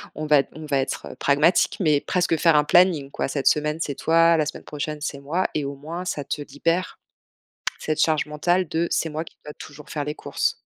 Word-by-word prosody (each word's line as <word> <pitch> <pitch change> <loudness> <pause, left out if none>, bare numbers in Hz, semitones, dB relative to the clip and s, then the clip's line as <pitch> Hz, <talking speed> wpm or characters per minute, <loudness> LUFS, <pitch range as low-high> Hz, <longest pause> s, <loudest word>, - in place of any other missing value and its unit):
on 155 +1 -4
va 150 -2 +5
on 155 0 -9
va 140 -2 0
être 130 - -4
pragmatique, 150 +5 +3
mais 150 -5 +3
presque 175 -3 0
faire 165 -1 +4
un 150 - +5
planning, 160 -5 +3
quoi. - - -2
«Cette 135 0 -2
semaine, 150 +1 +2
c'est 140 -4 -2
toi, 165 +1 +4
la 155 - +1
semaine 155 - -6
prochaine 150 0 -5
c'est 145 -2 -4
moi» 165 +7 -1
et 150 -2 -1
au 140 0 -5
moins, 165 +6 -6
ça 150 -5 -3
te 145 - -4
libère 165 +6 -2 0.8
cette 155 -1 -2
charge 155 -2 +2
mentale 175 +4 0
de 165 +1 0
«c'est 165 - 0
moi 155 +2 -4
qui - - -16
dois 150 - -8
toujours 145 0 -12
faire 145 -2 -3
les 150 +1 -4
courses». - - -1
150 Hz, 220 wpm, -23 LUFS, 145-165 Hz, 0.8 s, va